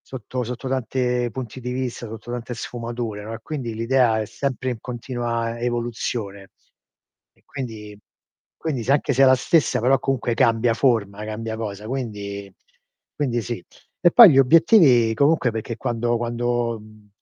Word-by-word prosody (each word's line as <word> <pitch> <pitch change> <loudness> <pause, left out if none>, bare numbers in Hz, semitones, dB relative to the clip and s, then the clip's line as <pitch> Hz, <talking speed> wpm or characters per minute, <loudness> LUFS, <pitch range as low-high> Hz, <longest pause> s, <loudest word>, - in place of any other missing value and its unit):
sotto 125 0 -6
sotto 125 +3 -5
tante 125 -1 -1
punti 130 -2 -6
di 125 +1 -4
vista, 125 -2 -4
sotto 110 +2 -9
tante 120 0 -5
sfumature, 115 -3 -5
no, 110 - -7
e 115 - -8
quindi 130 -7 -5
l'idea 115 -1 +2
è 110 - -3
sempre 130 +2 -3
in 120 - -4
continua 120 -1 -3
evoluzione. 115 -4 -3 0.9
E - - -31
quindi 110 -8 -7 0.6
quindi 145 -7 -3
se 120 - -2
anche 140 0 +2
se 135 +1 +3
è - - +8
la 130 0 +6
stessa 165 +3 +2
però 130 +4 +3
comunque 125 -3 -1
cambia 115 0 +2
forma, 105 -5 0
cambia 110 +1 -5
cosa. 105 -2 -6
Quindi 100 -6 -5 0.6
quindi 125 -5 -1
sì. 110 -4 -5 0.4
E 175 - +5
poi 230 -7 +10
gli 135 - +4
obiettivi, 135 - +5
comunque, 140 +1 +3
perché 110 +1 -4
quando 120 0 -1
quando, 120 -1 -1
mhmm, 110 -1 -17
120 Hz, 155 wpm, -22 LUFS, 110-130 Hz, 0.9 s, poi